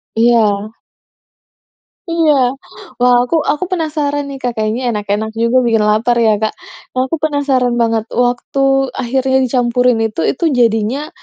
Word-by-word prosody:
Iya. 220 Hz, -3 st, +2 dB, 1.4 s
Iya. 330 Hz, -2 st, +2 dB, 0.7 s
Wah, 250 Hz, 0 st, +5 dB
aku 330 Hz, -, -1 dB, 0.2 s
aku 300 Hz, -, -3 dB
penasaran 300 Hz, -4 st, -1 dB
nih 275 Hz, -, -7 dB
Kak, 245 Hz, -, -1 dB
kayaknya 220 Hz, +2 st, -2 dB
enak-enak 210 Hz, +1 st, -2 dB
juga 235 Hz, +2 st, +2 dB
bikin 225 Hz, -2 st, +2 dB
lapar 225 Hz, +3 st, +2 dB
ya 220 Hz, -, +4 dB
Kak. 220 Hz, -, -1 dB, 0.4 s
Aku 260 Hz, +4 st, 0 dB
penasaran 280 Hz, -5 st, +1 dB
banget. 225 Hz, -1 st, 0 dB
Waktu 245 Hz, +2 st, -1 dB, 0.4 s
akhirnya 265 Hz, +2 st, 0 dB
dicampurin 245 Hz, -1 st, +1 dB
itu, 215 Hz, -6 st, -3 dB
itu 335 Hz, -, -3 dB
jadinya, 235 Hz, +6 st, 0 dB
245 Hz, 130 wpm, -15 LUFS, 225-275 Hz, 1.4 s, Wah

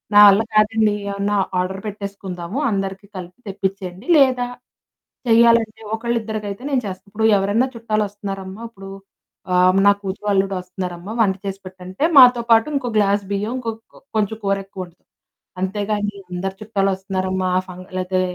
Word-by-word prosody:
నా -, -, +9 dB
వల్ల 200 Hz, +1 st, +6 dB
కాదండి 215 Hz, 0 st, +3 dB, 0.2 s
ఏమన్నా 200 Hz, +1 st, -1 dB, 0.2 s
ఆర్డర్ 190 Hz, +1 st, -2 dB
పెట్టేసుకుందాము, 200 Hz, -1 st, -6 dB
అందరికీ 195 Hz, 0 st, -3 dB
కలిపి 180 Hz, +5 st, -9 dB
తెప్పించేయండి 190 Hz, -, -4 dB
లేదా 255 Hz, -3 st, +3 dB, 0.8 s
చెయ్యాలంటే 230 Hz, -1 st, +4 dB
ఒకళ్ళిద్దరికైతే 220 Hz, -2 st, -3 dB
నేను 265 Hz, -3 st, +1 dB
చేస్తాను. 190 Hz, 0 st, -7 dB
ఇప్పుడు 220 Hz, +2 st, 0 dB
ఎవరైనా 205 Hz, +6 st, +1 dB
చుట్టాలొస్తున్నారమ్మ, 205 Hz, -3 st, -3 dB
ఇప్పుడు 195 Hz, -3 st, -11 dB, 0.6 s
ఆహ్, 185 Hz, +1 st, +5 dB
నా 200 Hz, -, +8 dB
కూతురు, 195 Hz, +1 st, -5 dB
అల్లుడు 195 Hz, 0 st, +1 dB
వస్తున్నారమ్మ 180 Hz, +1 st, -6 dB
వంట 200 Hz, -4 st, +3 dB
చేసి 195 Hz, 0 st, -4 dB
పెట్టంటే, 185 Hz, +4 st, -7 dB
మాతో 250 Hz, -2 st, +8 dB
పాటు 225 Hz, +3 st, +5 dB
ఇంకో 255 Hz, -3 st, -1 dB
గ్లాస్ 200 Hz, -1 st, +2 dB
బియ్యం 205 Hz, +4 st, -1 dB
ఇంక్ 240 Hz, -3 st, -3 dB, 0.5 s
కొంచెం 215 Hz, 0 st, 0 dB
కూర 195 Hz, 0 st, +1 dB
ఎక్కువ 195 Hz, -1 st, -8 dB
వండుతాం. 175 Hz, 0 st, -23 dB, 0.5 s
అంతేగాని 205 Hz, +1 st, -1 dB, 0.2 s
అందరి 190 Hz, +2 st, -3 dB
చుట్టాలు 200 Hz, -2 st, 0 dB
వస్తున్నారమ్మా 190 Hz, -1 st, -2 dB, 0.2 s
ఫం 180 Hz, -1 st, -9 dB, 0.2 s
లేతే 185 Hz, 0 st, 0 dB
200 Hz, 135 wpm, -20 LUFS, 190-220 Hz, 0.8 s, నా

